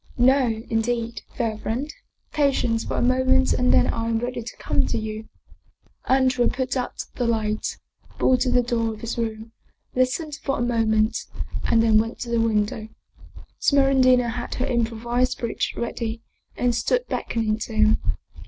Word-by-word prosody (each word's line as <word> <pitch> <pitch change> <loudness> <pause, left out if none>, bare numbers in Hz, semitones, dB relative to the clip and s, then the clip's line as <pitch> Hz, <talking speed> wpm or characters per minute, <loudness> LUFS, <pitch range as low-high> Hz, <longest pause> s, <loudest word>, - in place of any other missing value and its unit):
" - - -26
No, 245 -3 +3
indeed, 230 +1 -1
fair 225 -3 -2
friend. 255 +8 -3 0.4
Patience 260 -6 +1
for - - -3
a - - +1
moment 260 +1 +3
and 250 0 +2
then - - +5
I 230 0 -1
am 225 - +1
ready 245 +1 -3
to 230 - -9
come - - 0
to 235 - -1
you." 220 0 -5 0.8
Andrea 260 -2 +3
put 260 +1 -1
out 250 -1 -3
the 245 - 0
light, 215 -2 -1 0.4
bolted 255 0 +2
the 245 - +4
door 230 -2 -1
of 215 - -14
his 230 +1 -4
room, 225 0 -4 0.4
listened 280 +4 0
a 270 -3 0
moment, 220 -2 +1 0.4
and 225 -1 +4
then 220 -1 +5
went 225 +2 -2
to 240 - -4
the 235 -1 +2
window. 215 -1 0 0.7
Smeraldina 260 -3 +4
had 240 +1 -4
her 255 - -1
improvised 235 +1 0
bridge 235 -2 -2
ready 230 -1 -3 0.3
and 245 -1 +2
stood - - +1
beckoning 220 -1 -1
to 225 - -5
him. 215 0 +4
235 Hz, 160 wpm, -24 LUFS, 225-255 Hz, 0.8 s, then